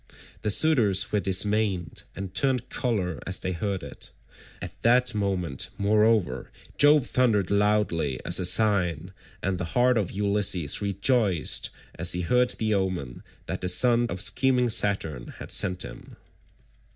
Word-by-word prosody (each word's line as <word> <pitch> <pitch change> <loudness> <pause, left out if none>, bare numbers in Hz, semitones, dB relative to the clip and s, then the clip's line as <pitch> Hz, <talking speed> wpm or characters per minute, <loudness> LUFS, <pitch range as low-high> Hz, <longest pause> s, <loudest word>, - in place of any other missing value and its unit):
The 105 - -2
suitors 105 -7 +3
were 105 - +1
dismayed, 95 -2 0
and 95 -1 -7
turned 130 +2 +1
colour 95 - -2
as 95 - 0
they 95 - -4
heard 95 +1 -3
it; - - -7 0.5
at - - -10
that 125 +1 +3
moment, 95 -9 -2
moreover, 105 -1 +1 0.3
Jove 145 -1 +4
thundered 110 -7 +1
loudly 100 -9 0
as - - +2
a 90 - 0
sign, 90 -4 +2 0.3
and 95 -1 -2
the - - -3
heart 125 -1 +3
of 100 - -2
Ulysses 100 -6 0
rejoiced 100 - 0 0.3
as 85 +2 +2
he 90 - -3
heard 125 +8 +1
the 110 -1 -1
omen 90 -11 -3 0.2
that - - -5
the 90 - -2
son 120 +5 +4
of 90 - -5
scheming 125 +3 +1
Saturn 90 - -1
had - - -7
sent 90 -2 +2
him. - - -11
100 Hz, 145 wpm, -25 LUFS, 90-115 Hz, 0.5 s, Jove